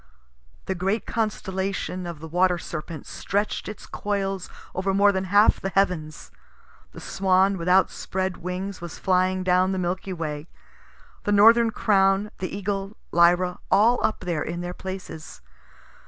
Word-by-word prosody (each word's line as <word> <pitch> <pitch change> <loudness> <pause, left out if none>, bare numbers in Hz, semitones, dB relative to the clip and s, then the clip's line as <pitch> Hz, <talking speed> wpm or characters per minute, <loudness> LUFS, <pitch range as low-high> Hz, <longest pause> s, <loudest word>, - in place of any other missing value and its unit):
The 190 - -1
great 195 +5 -1
constellation 190 -4 -2
of 170 -3 -7
the 160 - -7
Water 180 +2 +2
Serpent 160 -2 -7
stretch'd 205 +1 -2
its 210 - -9
coils 195 -2 -3 0.2
over 190 +1 -1
more 200 +1 +5
than 190 -1 -2
half 205 +3 +4
the 195 - -2
heavens. 180 -6 -1 0.6
The - - -10
Swan 190 0 +2
with 175 -1 -3
outspread 190 0 +1
wings 180 +2 -5
was 175 -1 -7
flying 185 0 +1
down 185 +1 +3
the - - -2
Milky 185 +1 -2
Way. 155 -2 -5 0.8
The 205 - +1
northern 230 +3 +6
Crown, 195 -1 +2
the 185 - -3
Eagle, 200 +1 -4
Lyra, 175 +1 +3
all 225 +5 +4
up 220 0 0
there 170 -4 -2
in 170 +3 -4
their 175 0 -4
places. 185 -4 -8
190 Hz, 145 wpm, -24 LUFS, 180-195 Hz, 0.8 s, northern